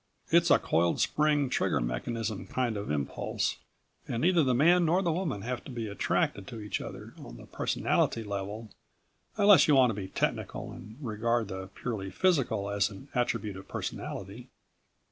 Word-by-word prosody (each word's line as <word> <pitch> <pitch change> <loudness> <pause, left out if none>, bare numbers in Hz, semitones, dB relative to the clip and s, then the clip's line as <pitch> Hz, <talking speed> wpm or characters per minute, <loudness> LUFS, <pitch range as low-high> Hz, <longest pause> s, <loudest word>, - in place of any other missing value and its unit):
It's - - +5
a - - +7
coiled 85 +1 +1
spring, 150 -2 +2
trigger 130 - +1
mechanism 100 - -3
kind 120 -1 -1
of 100 0 -4
impulse 75 -2 -1 0.5
and 115 - -2
neither 175 -1 +4
the 130 -2 +2
man 175 +7 +5
nor 175 +4 +2
the 170 - +1
woman 155 - -2
have 125 +1 -3
to - - -8
be 115 -3 -4
attracted 100 -1 -1
to 115 - -7
each 105 -1 -3
other - - -8
on - - -10
the - - -12
personality 115 - 0
level, 105 +2 -5 0.7
unless 200 -7 +7
you 150 - +5
want 130 -3 +5
to 105 -1 -4
be 95 - -5
technical - - -2
and 110 +3 -10
regard 115 -3 -1
the 95 -1 -5
purely 105 -6 -4
physical 125 - +1
as 100 0 +1
an 105 +7 -12
attribute 120 -5 -1
of 95 - -11
personality. 100 +6 -6
115 Hz, 170 wpm, -29 LUFS, 100-135 Hz, 0.7 s, a